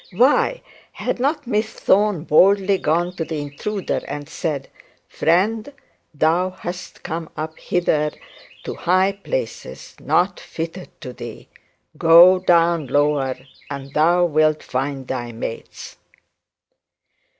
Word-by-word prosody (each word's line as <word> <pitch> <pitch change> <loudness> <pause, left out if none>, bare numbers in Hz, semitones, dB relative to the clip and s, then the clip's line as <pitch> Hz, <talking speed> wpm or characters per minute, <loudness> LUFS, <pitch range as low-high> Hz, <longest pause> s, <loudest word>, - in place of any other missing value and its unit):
Why 275 - +3 0.3
had - - -3
not 290 +3 0
Miss 215 -2 -1
Thorne 200 -5 +2
boldly 195 +4 +4
gone 175 +3 0
to 165 - -1
the 160 -1 -4
intruder 165 +8 -3
and 145 -1 -6
said: 150 -4 -3 0.4
'Friend, 215 - +1 0.4
thou 165 +4 +1
hast 185 -1 -8
come 165 -2 -5
up 160 +1 -5
hither 150 -4 0 0.5
to - - -5
high 185 +2 +2
places 485 - -5
not 180 +1 +1
fitted 170 +3 -6
for 125 -4 -8
thee. 120 -2 -9 0.5
Go 170 +3 +8
down 170 -4 +3
lower, 145 -2 +1 0.3
and 140 -1 -7
thou 175 +3 +4
wilt 155 -1 +2
find 135 0 -3
thy 120 -2 -4
mates.' 115 0 -7
170 Hz, 115 wpm, -21 LUFS, 150-190 Hz, 0.5 s, Go